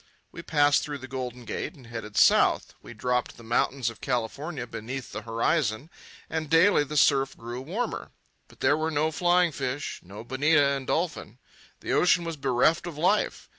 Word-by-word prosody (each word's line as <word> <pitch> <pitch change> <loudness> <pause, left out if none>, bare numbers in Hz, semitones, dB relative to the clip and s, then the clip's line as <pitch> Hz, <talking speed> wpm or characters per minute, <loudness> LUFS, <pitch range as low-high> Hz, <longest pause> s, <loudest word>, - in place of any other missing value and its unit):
We - - -8
passed 145 -2 +3
through 145 -1 -5
the 130 -1 -9
Golden 125 -2 -6
Gate 175 - -4
and 135 -5 -16
headed 115 -3 -7
south. - - +4
We - - -11
dropped 125 -1 -1
the 115 - -13
mountains 120 +2 0
of - - -16
California 130 +3 -3
beneath 125 +2 -6
the 105 - -5
horizon, 115 +4 -1 0.4
and 160 -2 -3
daily 165 0 +5
the 150 +1 -5
surf 135 -1 +3
grew 120 +2 -6
warmer. 205 - -4 0.4
But - - -21
there 145 +2 +4
were 155 +1 -1
no 155 0 0
flying 175 +1 +3
fish, 135 0 -4
no 100 +5 -10
bonita 145 +3 +3
and 140 -1 -3
dolphin. 160 - -2 0.4
The - - -2
ocean 180 -1 +4
was 165 -1 -4
bereft 140 +4 +1
of 165 -4 -7
life. 185 +7 +1
140 Hz, 175 wpm, -27 LUFS, 125-160 Hz, 0.4 s, daily